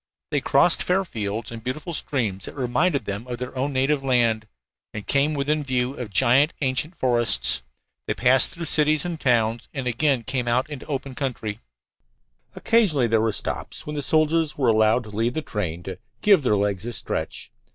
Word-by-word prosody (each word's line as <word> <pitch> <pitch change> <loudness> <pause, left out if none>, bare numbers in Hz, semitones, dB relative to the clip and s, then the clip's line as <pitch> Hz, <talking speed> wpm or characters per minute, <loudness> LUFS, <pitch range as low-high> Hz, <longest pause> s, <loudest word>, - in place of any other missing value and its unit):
They - - +1
crossed - - +3
fair 190 +2 +1
fields 110 - -4
and 115 -1 -8
beautiful 155 +7 -4
streams 110 - -2
that - - -9
reminded 140 +4 +1
them 100 +5 -5
of 120 -1 -4
their 125 +2 -6
own 135 +3 -1
native 135 +2 +1
land, 115 -4 +2 0.5
and 105 - -5
came 145 +2 +2
within 150 +2 0
view 130 -1 0
of 125 -6 -6
giant 130 +7 +3
ancient 135 +5 0
forests. 90 - +1 0.5
They - - -1
passed 130 +1 +4
through 170 0 -6
cities 155 0 +2
and 170 -3 -4
towns 115 -2 +1
and 135 -2 -3
again 125 +1 +1
came 130 0 -2
out 125 +4 +1
into 140 -2 -7
the - - -6
open 135 -1 -3
country. 125 -6 -4 1.0
Occasionally 190 - +3
there 110 -1 +3
were 110 0 +1
stops, - - -4
when 150 - -5
the 145 - -2
soldiers 155 +2 +1
were 130 -4 +2
allowed 110 +2 +3
to 110 - -11
leave 115 +4 -1
the 155 - -2
train 90 - -4
"to 95 - -7 0.2
give 200 -6 +6
their 105 -6 +2
legs 100 -1 -1
a 120 - -4
stretch." - - -3
130 Hz, 190 wpm, -24 LUFS, 115-145 Hz, 1.0 s, give